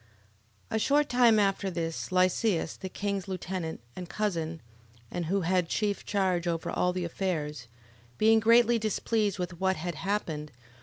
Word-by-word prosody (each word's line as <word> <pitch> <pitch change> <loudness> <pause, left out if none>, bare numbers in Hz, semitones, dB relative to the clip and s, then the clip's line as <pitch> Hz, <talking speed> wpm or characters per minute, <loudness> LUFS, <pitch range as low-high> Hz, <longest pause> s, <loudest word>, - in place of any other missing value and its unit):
11:1. - - -1
A - - +2
short 290 +5 +2
time 240 -3 +5
after 195 -1 +1
this 165 -2 -3
Lysias, 185 -1 +2
the 190 - -6
king's 200 0 -3
lieutenant, 185 -4 -4
and 180 -1 -7
cousin, 170 -6 -2 0.5
and 175 -2 -3
who 195 +3 +1
had 180 0 +1
chief 205 -2 -1
charge 185 -4 +1
over 165 -1 -1
all 180 - +1
the 180 -1 -2
affairs, 155 -8 -3 0.5
being 220 +1 +5
greatly 235 +1 +5
displeased 215 -1 0
with 180 -2 -4
what 190 0 +2
had 175 +1 -4
happened, 165 -7 -3
11:2. - - -29
185 Hz, 160 wpm, -29 LUFS, 170-210 Hz, 0.5 s, time